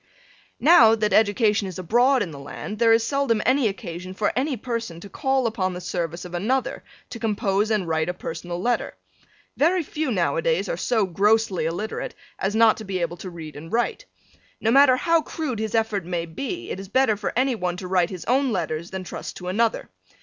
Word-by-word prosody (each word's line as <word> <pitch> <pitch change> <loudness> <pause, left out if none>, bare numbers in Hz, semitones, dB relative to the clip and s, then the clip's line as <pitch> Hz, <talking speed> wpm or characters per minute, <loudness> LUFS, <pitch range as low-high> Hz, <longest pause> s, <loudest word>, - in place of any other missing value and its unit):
Now, 240 -9 +7
that 215 -1 0
education 210 -1 +3
is 185 - -7
abroad 240 +8 +3
in 175 - -6
the 140 - -9
land, 210 +9 -7
there 230 -1 +5
is 225 0 +5
seldom 275 -5 +1
any 255 -1 +3
occasion 185 -1 -6
for 205 +1 0
any 270 +1 0
person 230 -7 -4
to 200 - -11
call 265 0 0
upon 190 -5 -1
the - - -5
service 175 -1 -4
of 180 - -9
another 235 +10 -1 0.3
to 235 - -6
compose 210 -2 0
and 210 -5 0
write 160 0 0
a - - -1
personal 175 +1 -5
letter. 240 +5 -1 0.6
Very 345 +4 +3
few 305 0 -3
now 180 -6 +1
a - - +1
days - - +1
are - - -1
so 230 - +1
grossly 205 0 +2
illiterate 190 +7 -4 0.2
as 195 +2 -1
not 225 -1 +5
to 220 - -7
be 195 -2 -3
able 175 -1 -2
to 185 - -7
read 160 -3 -9
and 160 +3 -10
write. 235 +1 -1 0.5
No 225 - +1
matter 270 0 +7
how 330 +3 +3
crude 290 -7 -4
his 220 0 -2
effort 220 -4 0
may 170 -1 -3
be 275 - -5
it - - -4
is 195 - -8
better 260 -2 +3
for 205 0 -3
any 260 +2 +2
one 180 -5 -2
to 185 - -6
write 180 -2 +2
his 185 -3 -7
own 265 +1 +2
letters 170 -4 -2
than 190 -1 -5
trust 175 - -7
to 180 - -6
another. 225 +4 0
215 Hz, 210 wpm, -24 LUFS, 180-245 Hz, 0.6 s, Now